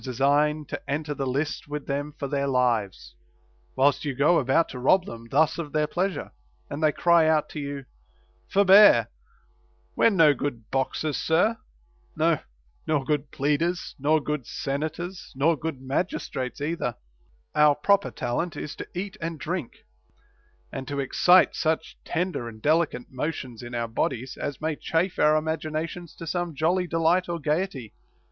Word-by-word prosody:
159 130 -2 -5
design 145 +3 +2
to - - -7
enter 150 +1 -2
the 135 -2 -3
list 145 +5 -2
with 145 0 -5
them 145 +1 -3
for 140 - -3
their 140 0 -1
lives, 120 -7 0 0.6
whilst 140 +1 +3
you 145 -3 -3
go 150 +6 +4
about 135 +5 +2
to 125 - -8
rob 180 +9 +4
them 115 0 -9
thus 155 +5 +2
of 155 -3 -5
their 155 -1 +2
pleasure, 180 +1 -2 0.4
and 145 - -4
they 155 -1 +4
cry 170 0 +4
out 155 -1 +2
to 155 - -7
you, 140 -1 -5 0.3
" - - -37
Forbear, 200 +1 +7 0.9
we're - - +5
no 165 -8 +5
good 120 -5 -5
boxers, 140 +3 -1
sir; 180 +8 +2 0.6
no, - - +2 0.5
nor 150 -4 +1
good 145 -1 -1
pleaders, 160 +6 -1
nor 155 +3 +3
good 150 -3 -3
senators, 160 +6 -4
nor 155 +5 +3
good 155 -2 -5
magis 135 +8 -2
trates 130 +1 -4
either; 145 -6 -2 0.6
Our 150 -1 +5
proper 200 +7 +2
talent 130 +7 -3
is 150 - -5
to - - -6
eat 195 +3 -4
and 165 -1 -4
drink,* 165 -3 -5 0.9
and 135 0 -5
to 140 -1 -3
excite 180 +7 +4
such 160 0 -1
tender 175 -9 -2
and 110 -1 -12
delicate 155 -1 +1
motions 130 -3 -4
in 120 0 -7
our 115 -1 -1
bodies 125 +2 -2
as 145 - -5
may 155 0 -1
chafe 170 +3 -1
our 150 0 +5
imaginations 160 +2 -3
to 165 - -8
some 175 -1 -2
jolly 175 +5 +1
delight 165 +2 +2
or 170 - -1
gayety." 150 - -2
150 Hz, 165 wpm, -26 LUFS, 135-165 Hz, 0.9 s, Forbear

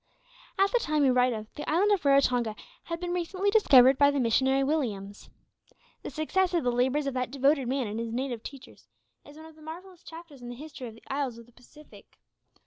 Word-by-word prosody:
At 390 +1 +3
the - - +2
time 305 -7 0
we 265 - +4
write 250 0 +3
of, 215 -2 -7
the 295 - -6
island 380 +7 +2
of 400 -3 +1
Raratonga 250 -5 +2 0.3
had 335 0 -5
been 350 0 -3
recently 370 +3 -1
discovered 270 - +6
by 285 0 +6
the 285 -1 -1
missionary 265 +3 +2
Williams. 215 -9 -3 0.7
The - - -6
success 360 +4 -1
of 335 - +1
the 245 - +1
labours 260 +4 0
of 275 - -2
that 255 -1 -2
devoted 275 0 +1
man 265 0 -1
and 215 +1 -5
his 230 -1 -4
native 245 -1 -3
teachers, 275 +1 -12 0.4
is 290 +1 -14
one 315 - -12
of 320 - -14
the 310 - -20
most - - -14
marvellous 360 +1 -12
chapters 325 -5 -12
in 240 - -8
the 245 - -7
history 285 -2 -9
of 220 - -11
the 225 - -19
isles 270 -4 -3
of 235 - -13
the 240 - -23
Pacific. 270 +5 -18
275 Hz, 225 wpm, -28 LUFS, 245-320 Hz, 0.7 s, discovered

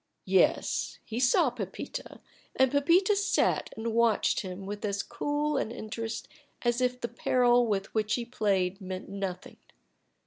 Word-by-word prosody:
Yes, - - +2
he 225 +1 -4
saw 255 +3 +4
Pepita, 200 -6 -6 0.4
and 265 -1 +4
Pepita 340 +8 +4
sat 400 0 +1
and 225 0 -3
watched 230 -1 +3
him 185 0 -6
with 205 +2 -6
as 200 -1 -1
cool 290 +4 -1
an - - -1
interest 225 0 -5 0.4
as 240 +1 +1
if 250 0 +1
the 235 - -2
peril 245 0 +3
with 195 -2 -2
which 215 0 +1
he 240 - -3
played 200 -5 0
meant 185 0 -6
nothing. 195 -2 -5
230 Hz, 145 wpm, -29 LUFS, 200-250 Hz, 0.4 s, saw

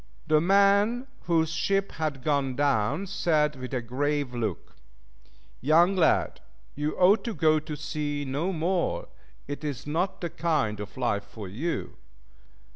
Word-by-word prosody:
The 155 -1 +3
man 200 +6 +4 0.2
whose 165 -2 +2
ship 195 +4 0
had 150 -5 -3
gone 140 -3 0
down 140 - +1
said 155 -6 +1
with 130 -1 -7
a 125 -3 -2
grave 140 +2 -1
look, 110 -9 -4 0.9
"Young 170 +7 +4
lad, 170 -4 +2 0.3
you 150 +2 -3
ought 195 +3 +5
to 230 -3 -3
go 155 -1 +3
to 150 0 -6
sea 145 -1 -3
no 150 +8 -1
more, 175 +1 -1 0.4
it 145 +2 -6
is 145 -5 -4
not 165 +6 -1
the 170 -3 -3
kind, 155 -11 0
of 105 -2 -8
life 100 0 0
for 105 -4 -9
you." 135 - -4
150 Hz, 145 wpm, -27 LUFS, 135-175 Hz, 0.9 s, ought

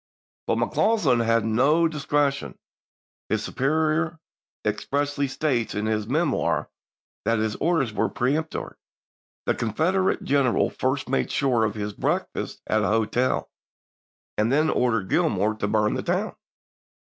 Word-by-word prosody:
But - - +1
McCausland 160 - +2
had 115 -1 +2
no 140 +9 +3
discre 145 -2 +1
tion; 140 - -8 0.7
his - - 0
superior 155 +4 0 0.5
expressly 140 +6 -1
states 130 -4 -1
in 105 +1 -1
his 110 -1 -1
"Memoir" 155 +8 0 0.5
that 115 - +2
his 110 0 -1
orders 155 -8 +1
were - - +1
peremptory. 150 +6 -2 0.7
The - - +2
Confeder 170 - +1
ate - - -10
general 135 -3 +2
first 130 +2 -1
made 135 - 0
sure 125 -5 +2
of 105 -1 -2
his 105 -1 -4
breakfast - - -2
at 110 - +1
an - - +1
hotel, 115 +4 0 0.9
and 110 +3 +2
then 155 +3 +3
ordered 115 -6 +1
Gilmor 110 - +1
to 100 - 0
burn 105 0 +2
the - - -2
town. - - -1
130 Hz, 135 wpm, -25 LUFS, 110-155 Hz, 0.9 s, no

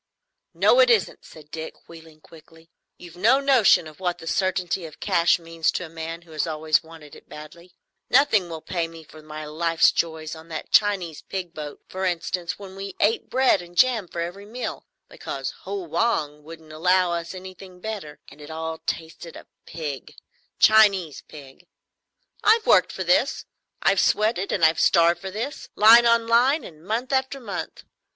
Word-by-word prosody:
"No, - - +4
it - - +6
isn't," 465 - +1
said 150 -2 -15
Dick, 160 +1 -8
wheeling 160 -2 -15
quickly. 165 +1 -18 0.3
"You've 175 -1 -13
no 230 +9 +4
notion 265 -11 +4
what 175 +3 -4
the - - -12
certainty 185 0 -1
of 155 - -15
cash 175 -4 +2
means 165 -1 -2
to 180 - -3
a - - -11
man 165 +1 -7
who 165 - -19
has 155 +1 -2
always 155 0 +1
wanted 160 -2 -14
it - - -17
badly. 170 +4 -12 0.3
Nothing 220 -9 +3
will 160 -1 -7
pay 170 -2 -2
me 165 -1 -12
for 155 0 -15
some 155 - -17
of - - -19
my 155 0 -7
life's 165 +2 +2
joys; 160 -1 -3
on 160 +1 -13
that 160 -2 -7
Chinese 190 -7 +2
pig 180 -3 -6
boat, 150 -2 -8
for 190 +1 -6
instance, 175 0 -2
when 195 -2 -11
we 195 0 -7
ate 220 +3 +1
bread 260 -5 +3
and 175 0 -14
jam 235 -5 +3
for 170 0 -5
every 175 +4 -6
meal, 245 +3 -6 0.2
because - - -6
Ho 400 -2 -4
Wang 155 - -1
wouldn't 160 0 -13
allow 180 +2 +2
us 170 +2 -4
anything 185 0 -11
better, 195 -8 -7
and 145 +2 -15
it 145 - -11
all 160 0 -5
tasted 165 +1 -5
of - - -13 0.2
pig,—Chinese 170 +4 +1
pig. 145 +3 -14 0.8
I've 440 +1 +4
worked - - +4
for - - -4
this, - - +1 0.4
I've - - +3
sweated 210 -2 +1
and 170 - +3
I've 160 0 +3
starved 170 0 +3
for 190 - -5
this, 230 +9 -6
line 230 +3 +7
on 235 0 +3
line 250 +6 +3
and 155 -5 -13
month 230 +7 -3
after 265 +1 0
month. 225 -6 -6
175 Hz, 180 wpm, -24 LUFS, 160-205 Hz, 0.8 s, line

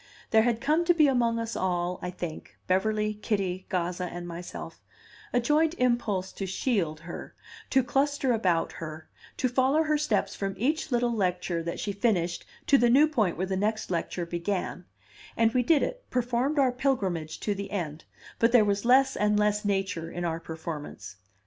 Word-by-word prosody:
There 220 - +6
had 235 0 +1
come 305 +5 +2
to 350 0 +4
be 310 -2 +6
among 240 -4 +2
us 230 0 -3
all, 180 -1 -1
I 180 - -3
think 175 -3 -7
Beverly, 210 +3 +1
Kitty, 195 -3 -2
Gazza, 180 -1 -1
and 175 0 -6
myself 175 +1 -8 0.5
a 245 - +3
joint 305 +6 +2
impulse 215 -7 0
to 195 - -5
shield 185 - -1
her, 170 +1 -8 0.3
to 265 0 +3
cluster 275 +1 +1
about 180 -7 +1
her, 155 -1 -8 0.3
to 255 - +1
follow 265 +5 +3
her 305 -1 +1
steps 300 - 0
from 195 -1 -3
each 295 +6 0
little 240 -1 +2
lecture 180 -4 -1
that 170 +1 -4
she 205 - -2
finished 185 -5 0 0.2
to 275 - +5
the 240 - +4
new 275 +5 +7
point 220 - 0
where 185 - 0
the 190 0 -2
next 215 +1 -1
lecture 175 0 -2
began; 175 +1 -3 0.5
and 225 0 +3
we 255 - +3
did 290 +4 +3
it, - - -3
performed 250 +4 0
our 265 -3 +4
pilgrimage 195 - -1
to 210 - 0
the 200 0 -5
end; 165 -6 -4 0.3
but 230 +1 +4
there 235 -3 +6
was 200 0 0
less 265 +2 +5
and 210 0 +2
less 210 0 +2
nature 195 -5 -1
in 175 +1 -4
our 165 -1 -1
performance. 160 -10 -7
210 Hz, 180 wpm, -28 LUFS, 180-250 Hz, 0.5 s, new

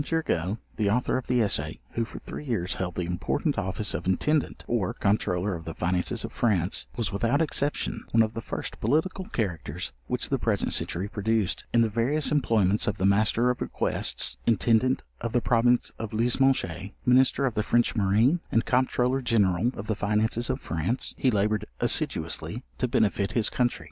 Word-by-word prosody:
Turgot, 110 - -1 0.2
the 105 -2 +1
Author 125 +5 +1
of 130 - -3
the 125 -2 +3
Essay, 100 - -1
who, 115 - -1
for - - -10
three - - -8
years 110 -9 -1
held 90 -2 -4
the 90 - -1
important 90 0 -1
office 95 +3 -2
of - - -4
Intendant 150 - 0
or 115 -6 -1
Comptroller 100 -1 0
of 85 -1 -6
the 80 - -6
finances 90 +6 -1
of 115 - -7
FRANCE, 100 -7 0
was, 110 -6 -1
without 115 +7 +1
exception, 150 -2 -1
one 115 0 +4
of 110 0 -3
the 115 - -4
first - - -6
political 160 - 0
characters 105 - -3
which - - -1
the - - 0
present - - 0
century 95 +4 0
produced: 105 -1 -1
In 120 - +4
the 115 - +4
various 125 +8 +1
employments 110 -8 +2
of 105 -1 0
the 95 - 0
Master 110 +5 +3
of 125 - -6
Requests, - - -1
Intendant 115 +4 +2 0.2
of 115 - -4
the 125 - +4
province 120 +1 +2
of 115 -1 -5
Lismoges, 115 - +1 0.2
Minister 130 +2 +4
of 125 - 0
the 110 - 0
French 120 +2 +1
marine, 110 - +3
and 115 - +2
Comptroller 125 +1 +1
General 105 -3 +2
of 100 - -6
the 110 - 0
finances 110 +4 0
of 130 +1 -1
France, 85 +10 -1
he 130 - +2
laboured 105 -1 +1
assiduously - - 0 0.2
to - - +1
benefit 100 -1 +1
his 115 -3 +1
country. 120 -1 0
110 Hz, 180 wpm, -27 LUFS, 100-125 Hz, 0.2 s, one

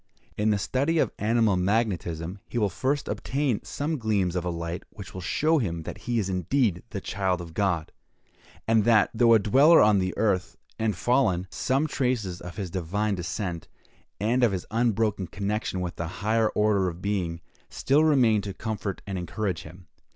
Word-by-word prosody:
In 105 +1 +1
the 105 - +3
study 140 +10 0
of - - +2
animal 110 -1 +2
magnetism, 90 -3 -1
he - - -4
will 105 -4 +1
first 135 +9 -1
obtain 135 -5 -1
some 150 +1 -3
gleams 100 -6 0
of 90 - -1
a 90 - -2
light 85 0 -4
which 100 -3 -11
will 95 - -6
show 155 - +2
him 85 - -2
that - - -7
he 120 - +1
is 105 -4 0
indeed 95 - 0
the 105 - -4
child 95 -1 -1
of 85 -2 -8
God! 90 -4 0 0.8
and 110 -1 +4
that, 110 -3 +4
though 115 0 +5
a - - +8
dweller 135 - +6
on 105 -1 +5
the 95 0 -2
earth, 100 -5 0 0.2
and 110 -3 0
fallen, 95 -5 +1
some 135 +4 0
traces 125 - -1
of 90 - -8
his 95 -5 -4
divine 100 +5 -1
descent, 90 -1 -4 0.5
and 120 +5 +1
of 115 -5 +4
his 90 - -3
unbroken 110 -4 +1
connection 100 -1 -3
with 90 -1 -5
a 85 - -2
higher 110 +5 0
order 105 -3 +2
of 85 0 -9
being, 90 -5 -1 0.3
still 145 +3 +2
remain 125 -9 +4
to 100 -1 -6
comfort 110 -3 -4
and 95 -2 -4
encourage 90 0 -3
him. 85 +3 -13
105 Hz, 180 wpm, -26 LUFS, 90-115 Hz, 0.8 s, a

